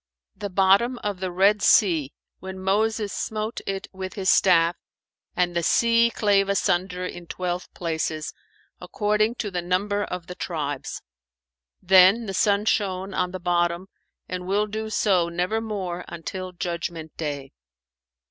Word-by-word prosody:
"The 205 -1 -5
bottom 195 +6 +3
of 205 -3 -2
the 185 -1 -3
Red 200 +3 +3
Sea, 165 -11 +4 0.3
when 190 +1 -7
Moses 210 +2 0
smote 215 +1 -3
it 195 -1 -3
with 190 0 -6
his 195 -2 +2
staff, 170 -2 +4 0.6
and 175 -1 0
the 170 - +2
sea 230 +6 +4
clave 200 -3 +2
asunder 185 -2 0
in 175 -1 -7
twelve 180 0 -4
places, 160 -2 -3 0.5
according 210 +2 0
to 210 -4 -4
the 180 -1 -2
number 200 +4 0
of 180 -3 -5
the 180 - -7
tribes;[FN#436] 145 -6 -4 0.8
then 190 +5 +6
the 195 - -4
sun 200 +2 +2
shone 195 -3 0
on 180 -1 0
the 185 +1 -6
bottom 175 +1 0 0.4
and 180 0 -5
will 205 +2 +2
do 220 +1 -5
so 190 -5 +2
nevermore 185 0 -2
until 185 +2 -6
Judgment 170 -3 -5
Day." 145 -4 -4
185 Hz, 140 wpm, -24 LUFS, 175-205 Hz, 0.8 s, then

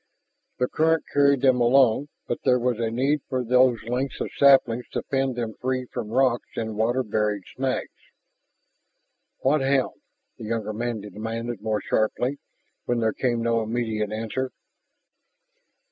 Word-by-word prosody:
The 125 - +1
current 160 +3 +2
carried 140 -2 +4
them 130 -2 +4
along, 130 +2 +4 0.2
but 120 - -2
there 125 - +4
was 125 -2 -1
a 115 -1 0
need 135 +5 +1
for 130 -1 -1
those 125 -1 +3
lengths 125 +3 -3
of - - -3
sapling 135 -4 +5
to - - -2
fend 135 -2 +1
them 115 -2 -3
free 130 0 -1
from 120 -4 -4
rocks 125 0 +1
and 110 -1 -3
water 120 +4 +1
buried 105 -2 -1
snags. 130 0 -2 1.5
"What 140 +2 +2
hound?" 135 -1 0 0.4
the 110 - -7
younger 110 -1 -2
man 115 0 -3
demanded 115 +3 -5
more 110 -1 -1
sharply 125 +5 0 0.5
when 120 -1 0
there 110 -1 +1
came 120 -3 -1
no 115 0 +1
immediate 110 -2 -2
answer. 115 +4 -3
120 Hz, 145 wpm, -25 LUFS, 110-130 Hz, 1.5 s, sapling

